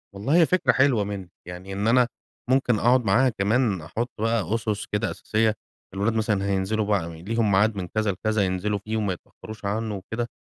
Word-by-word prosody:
والله 135 +11 0
هي 170 -2 +6
فكرة 185 +3 +3
حلوة 130 -6 +3
منِك، 100 -3 -6 0.2
يعني 90 +2 -8
إن 100 +3 -1
أنا 125 +1 +4 0.4
ممكن 125 -4 +2
أقعد 125 0 +3
معاها 125 +7 +4
كمان 105 -2 +1
أحط 115 +10 -3
بقى 115 -3 0
أُسس 110 -2 -2
كده 105 +2 0
اساسية، 110 0 0 0.4
الولاد 105 +4 0
مثلًا 110 -3 0
هينزلوا 100 +2 0
بقى 85 -6 -1
ليهم 110 +1 0
ميعاد 105 +3 +3
من 90 -3 -4
كذا 110 +1 0
لكذا 110 +3 -1
ينزلوا 100 +3 -1
فيه 110 +2 -4
وما 100 -3 0
يتأخروش 105 +4 -11
عنه 105 +1 -2
وكده، 110 +5 -4
105 Hz, 185 wpm, -25 LUFS, 100-115 Hz, 0.4 s, هي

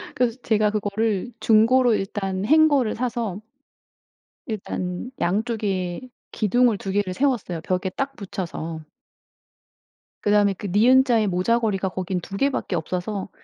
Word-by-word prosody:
그래서 245 -1 +1
제가 215 -2 +2
그거를 215 +1 -1
중고로 230 +3 +4
일단 195 -1 -3
hanger를 290 -5 +4
사서 230 -5 -3 1.0
일단 195 -1 -4
양쪽에 195 -2 -1 0.3
기둥을 235 +1 +2
2 195 - -5
개를 195 -2 0
세웠어요 215 - -1
벽에 185 +2 -1
딱 275 +8 -4
붙여서. 165 -6 -5 1.4
그다음에 205 -1 +3
그 200 +2 -7
니은자의 235 +3 +4
모자걸이가 195 +1 +1
거기는 185 0 -3
2 195 +3 -7
개밖에 275 -7 0
없어서 180 +5 -3
205 Hz, 290 characters per minute, -23 LUFS, 185-235 Hz, 1.4 s, 중고로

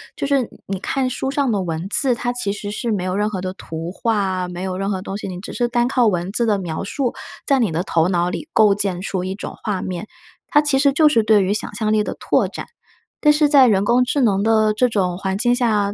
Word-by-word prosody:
就 - - -3
是 280 -1 +2
你 240 - -6 0.2
你 195 -1 -4
看 265 +6 -1
书 255 +1 -3
上 275 -2 0
的 200 -3 0
文 165 +1 -4
字， 250 +3 +3
它 245 +1 -2
其 245 -5 -2
实 205 0 -5
是 230 +2 -3
没 200 -4 -1
有 185 0 -2
任 210 +1 0
何 200 -3 -4
的 185 0 -4
图 165 -2 -7
画， 195 -4 -1
没 180 +1 -6
有 185 -1 -3
任 195 0 -1
何 190 -2 -1
东 195 - -5
西， 205 - -5
你 180 -2 -6
只 195 - -8
是 240 - 0
单 240 0 +1
靠 250 -3 +2
文 180 -1 -1
字 235 +2 0
的 210 -2 +2
描 175 -4 -4
述， 245 +5 -2 0.3
在 275 -1 +3
你 225 -8 +1
的 165 +2 -1
头 165 -3 +1
脑 175 -1 0
里 315 - -6
构 215 -2 +5
建 195 -3 -1
出 190 -1 -3
一 190 +1 -4
种 - - -7
画 195 -4 -2
面， 185 +3 -5 0.4
它 295 - +4
其 295 -3 +2
实 280 0 +4
就 305 +2 +4
是 265 -7 +4
对 215 -2 +4
于 190 - 0
想 215 - -4
象 215 0 0
力 215 - +2
的 - - -5
拓 - - +1
展。 - - -7 0.6
但 300 - +6
是 300 0 +3
在 280 -3 +6
人 200 -3 +2
工 245 +3 +3
智 275 +3 0
能 200 -5 +2
的 215 0 +3
这 250 +4 +2
种 185 -5 0
环 190 0 -2
境 240 +2 +2
下， 210 -5 +1
210 Hz, 285 characters per minute, -20 LUFS, 190-245 Hz, 0.6 s, 但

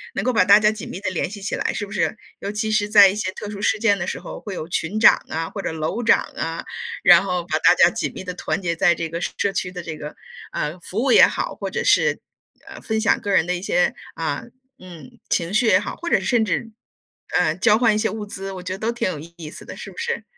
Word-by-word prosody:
能 - - -2
够 255 - +1
把 220 - +4
大 200 +2 +7
家 215 0 +3
紧 215 -2 -8
密 180 - -6
地 190 -2 -2
联 185 - -2
系 205 +1 -8
起 200 - -2
来， - - -1
是 205 - -3
不 200 - -14
是？ 210 +2 -1 0.2
尤 200 - -4
其 215 +1 -2
是 210 -1 +1
在 205 -2 +8
一 190 - -3
些 210 -3 -2
特 210 - -7
殊 200 -1 -7
事 210 - +2
件 205 -2 +2
的 175 - -3
时 - - -3
候， - - -8
会 200 -3 -6
有 155 - -5
群 175 +4 -2
长 225 - +6
啊， 165 +1 -3
或 200 - -5
者 - - -3
楼 160 +8 -3
长 225 - +4
啊， 165 0 -4 0.4
然 - - +7
后 180 -2 -2
把 160 -2 -1
大 175 - +5
家 175 -1 +5
紧 - - -3
密 - - -6
地 180 -1 -5
团 - - -3
结 170 -3 -2
在 175 0 +3
这 165 0 -3
个 165 +1 -5
社 195 +2 -2
区 180 - -2
的 180 -1 -7
这 160 -2 -6
个， 150 0 -7 0.4
呃， 150 +4 -3
服 180 +3 -9
务 270 - +2
也 - - +8
好， - - -3
或 - - -5
者 475 - -3
是， 480 - +3 0.5
呃， - - -10
分 220 -1 -2
享 220 - +2
个 205 - -3
人 180 -4 +3
的 180 - 0
一 175 - -5
些 180 -2 +1 0.2
啊， 160 -3 -3 0.4
嗯， 170 -7 -13
情 170 +2 -1
绪 220 - +3
也 185 -3 +5
好， 205 - -5
或 345 - -5
者 - - +3
是 - - -7
甚 235 -3 +2
至， 225 +1 -2 0.7
呃， 160 -3 +2
交 210 +4 +4
换 230 -2 +3
一 - - +1
些 220 +1 +1
物 215 -1 -5
资， 195 -1 -6
我 185 -1 -7
觉 185 0 -4
得 - - -5
都 225 +2 -1
挺 235 -5 -2
有 180 - -4
意 165 0 -10
思 - - -11
的， - - -9
是 - - -9
不 - - -18
是？ 470 0 -3
190 Hz, 300 characters per minute, -22 LUFS, 170-215 Hz, 0.7 s, 在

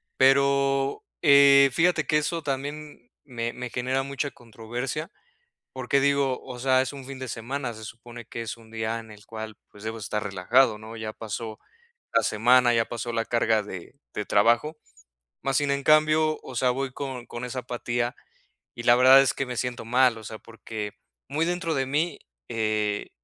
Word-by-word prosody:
Pero, 135 0 +3 0.2
eh, 140 -2 +7
fíjate 165 -2 +2
que 150 - +3
eso 165 +2 -1
también 145 -1 -5
me 120 -4 -3
me 125 0 -6
genera 130 +2 -1
mucha 140 +1 -3
controversia 120 +2 -6 0.6
porque 130 +2 0
digo: 140 -2 +1
"O 125 -2 -8
sea, 130 +1 +3
es 130 - -4
un 140 -2 -9
fin 135 0 -8
de 130 - -5
semana, 120 +2 -4
se 110 0 -10
supone 120 +2 -10
que 115 - -6
es 115 0 -5
un 115 -1 -18
día 110 0 -2
en 110 -1 -11
el 105 -1 -15
cual, 110 -1 -8
pues, 105 0 -14
debo 110 +1 -4
estar 105 0 -3
relajado 105 +5 +2
¿no? 110 +1 -10
Ya 110 -1 -5
pasó 110 0 -6 0.5
la 115 - +5
semana, 120 +4 +4
ya 115 -1 +2
pasó 120 0 -5
la 115 -1 0
carga 115 -2 +2
de 95 +1 -9 0.2
de 105 - -2
trabajo". 120 +9 +3 0.7
Mas 135 -1 +1
sin 145 -1 +1
en 140 0 -1
cambio, 155 +1 +4
o 130 - -9
sea, 125 +1 +2
voy 135 +1 -3
con 130 -2 -6
con 120 +1 -6
esa 125 +1 -4
apatía, 120 -1 -2 0.6
y 120 - -7
la 120 0 +6
verdad 130 +2 +8
es 135 - +2
que 135 - -2
me 125 -1 -5
siento 125 0 -3
mal, 125 0 +3
o 110 - -10
sea, 110 +1 -7
porque 110 -2 -7 0.3
muy 150 +4 -1
dentro 175 -1 -1
de 135 -1 0
mí, 150 +6 -1 0.3
eh, 110 -2 -1
125 Hz, 185 wpm, -26 LUFS, 115-140 Hz, 0.7 s, verdad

